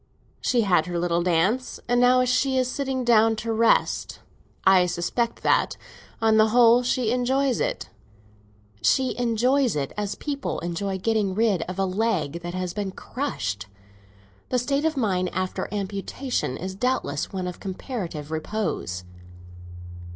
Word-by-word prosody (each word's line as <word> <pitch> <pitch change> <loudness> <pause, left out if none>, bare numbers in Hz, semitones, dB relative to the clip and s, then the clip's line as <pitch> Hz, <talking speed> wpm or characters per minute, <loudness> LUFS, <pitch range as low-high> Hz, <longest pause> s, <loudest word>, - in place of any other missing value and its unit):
She 245 - +2
had 180 -6 +2
her 175 -1 -3
little 170 0 +1
dance, 185 +9 +1
and 245 0 +3
now 250 0 +5
she 260 +1 +1
is 255 -1 +2
sitting 265 -1 -2
down 225 -1 +5
to 225 +1 -3
rest. 225 +1 +2 0.5
I 185 -2 +6
suspect 205 +7 -2
that, - - +2 0.4
on 220 -1 +3
the 215 0 +6
whole, 240 +1 +6
she 245 -2 0
enjoys 255 +2 +1
it." - - -2 0.9
"She 255 - +2
enjoys 245 - +2
it 140 -2 -2
as 205 -1 -3
people 285 -2 -3
enjoy 190 +3 -2
getting 205 -1 0
rid 210 -5 +2
of 185 - -5
a 195 - +1
leg 185 -6 -1
that 175 +1 -5
has 180 -1 -3
been 205 -2 -3
crushed. 110 - -4 0.8
The 255 - +1
state 275 +4 0
of 315 -2 0
mind 185 -7 +1
after 185 0 -2
amputation 200 - -3
is 185 +2 -5
doubtless 195 - -1
one 185 -2 -3
of 180 -1 -6
comparative 185 - -5
repose." 160 - -3
215 Hz, 145 wpm, -25 LUFS, 180-250 Hz, 0.9 s, I